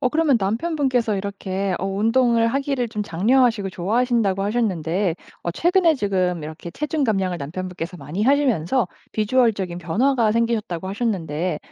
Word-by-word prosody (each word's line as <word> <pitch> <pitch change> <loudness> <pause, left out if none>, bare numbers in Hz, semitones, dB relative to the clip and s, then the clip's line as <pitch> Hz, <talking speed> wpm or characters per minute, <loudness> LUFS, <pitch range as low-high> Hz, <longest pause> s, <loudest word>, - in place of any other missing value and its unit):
어 255 - +2
그러면 305 -5 +3
남편분께서 240 - 0
이렇게 195 -1 -3
어 195 - -2
운동을 230 +3 +2
하기를 275 -1 -1
좀 210 -2 -2
장려하시고 210 +3 +2
좋아하신다고 210 0 +1
하셨는데 195 -5 0 0.3
어 170 - -2
최근에 345 - +3
지금 185 - 0
이렇게 155 +3 -7
체중 300 - -1
감량을 190 -5 0
남편분께서 180 +3 -5
많이 155 +6 -4
하시면서 255 - +2 0.3
비주얼적인 215 -5 +1
변화가 225 - +1
생기셨다고 220 -6 -1
하셨는데 180 -7 -2
210 Hz, 395 characters per minute, -22 LUFS, 185-245 Hz, 0.3 s, 그러면